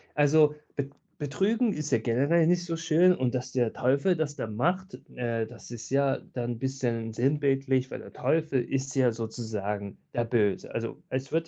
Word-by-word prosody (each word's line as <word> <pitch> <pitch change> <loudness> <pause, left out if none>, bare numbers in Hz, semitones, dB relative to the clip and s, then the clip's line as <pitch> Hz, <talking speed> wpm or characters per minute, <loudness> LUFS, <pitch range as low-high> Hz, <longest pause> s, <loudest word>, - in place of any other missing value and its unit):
Also, 150 +1 +5 0.2
be 140 -1 -2 0.3
betrügen 205 - +1
ist 150 -3 -4
ja 115 - +4
generell 140 +9 +3
nicht 175 0 +2
so 165 -1 -2
schön 165 +2 +4
und 130 -3 0
dass 125 0 -3
der 120 -3 +2
Teufel 140 +8 +2
das 150 -2 -1
dann 110 -2 -5
macht, 185 - 0 0.2
äh, 115 -2 -1
das 115 +1 -12
ist 115 -2 -7
ja 140 0 +3 0.2
dann 120 -1 -2
bisschen 120 -4 -2
sinnbildlich, 135 0 +1
weil - - -5
der - - -11
Teufel 140 -1 +1
ist 135 +1 -2
ja 130 -3 +4
sozusagen 105 -3 -4 0.2
der 120 -1 0
Böse. 105 -4 0
Also, 115 0 -4
es 130 +1 -3
wird 165 +1 0
135 Hz, 180 wpm, -28 LUFS, 120-155 Hz, 0.3 s, Also